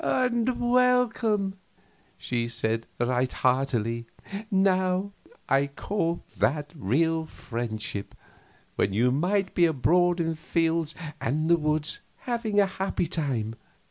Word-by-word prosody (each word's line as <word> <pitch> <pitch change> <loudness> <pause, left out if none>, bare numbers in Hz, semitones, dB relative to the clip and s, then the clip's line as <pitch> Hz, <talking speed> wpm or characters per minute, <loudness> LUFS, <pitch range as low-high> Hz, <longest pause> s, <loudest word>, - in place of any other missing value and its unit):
"And 250 -1 +1
welcome!" 240 -5 +2 0.6
she 120 -2 -2
said, 115 -1 -1
right 125 +1 +1
heartily. 120 -3 0 0.4
"Now 190 -1 +2 0.4
I 140 0 +3
call 170 +3 -2 0.2
that 145 +1 +1
real 160 - +1
friendship, 110 -6 -5 0.6
when 95 - +1
you 120 +5 +3
might 185 +7 +1
be 175 - +4
abroad 175 +4 +3
in 165 -1 +1
the 165 - -2
fields 165 0 0 0.3
and 155 +7 0
the - - +8
woods, 155 -1 0 0.2
having 230 -4 0
a 200 - +6
happy 190 -1 -2
time. 135 -10 -2
160 Hz, 115 wpm, -27 LUFS, 125-195 Hz, 0.6 s, the